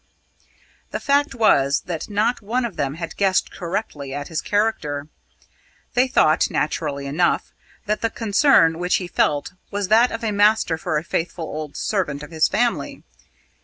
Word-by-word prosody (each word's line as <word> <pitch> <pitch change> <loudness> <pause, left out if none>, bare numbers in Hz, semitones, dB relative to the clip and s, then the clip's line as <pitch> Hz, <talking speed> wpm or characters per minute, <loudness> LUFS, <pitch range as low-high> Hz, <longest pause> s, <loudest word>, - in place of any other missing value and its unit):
The - - -4
fact 285 0 +1
was 140 - +3
that 170 +1 -5
not 215 +4 0
one 240 +4 -1
of 225 - -5
them 140 0 -2
had 165 0 -6
guessed 190 -2 +1
correctly 165 -7 -4
at 145 0 -5
his 160 -2 -2
character. 155 -9 -1 0.8
They 250 +2 +3
thought, 160 - +3
naturally 145 -2 -2
enough, 150 +6 0 0.3
that 210 0 -1
the 230 - +1
concern 205 - +3
which 180 0 +1
he 180 - -2
felt 145 -3 0 0.2
was 200 -1 -3
that 230 +3 +5
of 225 - -5
a 220 - 0
master 205 -5 +3
for 160 -3 -1
a 150 - -2
faithful 165 0 -3
old 155 -2 -6
servant 150 -9 -2
of 150 - -10
his 160 -1 +3
family. 235 +3 -1
180 Hz, 165 wpm, -22 LUFS, 155-220 Hz, 0.8 s, that